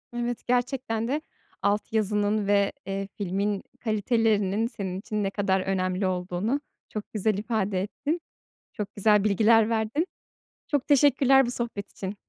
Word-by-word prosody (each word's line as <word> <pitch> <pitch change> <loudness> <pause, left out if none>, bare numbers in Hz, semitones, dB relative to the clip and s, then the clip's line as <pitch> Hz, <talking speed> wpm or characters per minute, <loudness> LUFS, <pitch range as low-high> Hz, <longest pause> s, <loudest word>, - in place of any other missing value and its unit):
Evet, 240 0 -3
gerçekten 245 -2 0
de 290 +5 -1 0.4
alt 205 +2 0
yazının 210 -1 +1
ve, 200 -1 +3
eee, 195 0 -3
filmin 200 +1 -1 0.2
kalitelerinin 220 -1 +1
senin 190 -6 -5
için 210 0 -3
ne 195 - +1
kadar 195 -2 +1
önemli 185 0 0
olduğunu 185 +8 -1 0.3
çok 215 -1 -6
güzel 215 -1 +1
ifade 205 -3 -1
ettin. 295 - -3 0.5
Çok 205 -1 -5
güzel 210 0 +4
bilgiler 215 +2 +4
verdin. 230 - 0 0.6
Çok 290 -2 0
teşekkürler 270 -2 +5
bu 240 - -2
sohbet 235 -5 -4
için. 195 +1 -5
210 Hz, 135 wpm, -26 LUFS, 195-235 Hz, 0.6 s, teşekkürler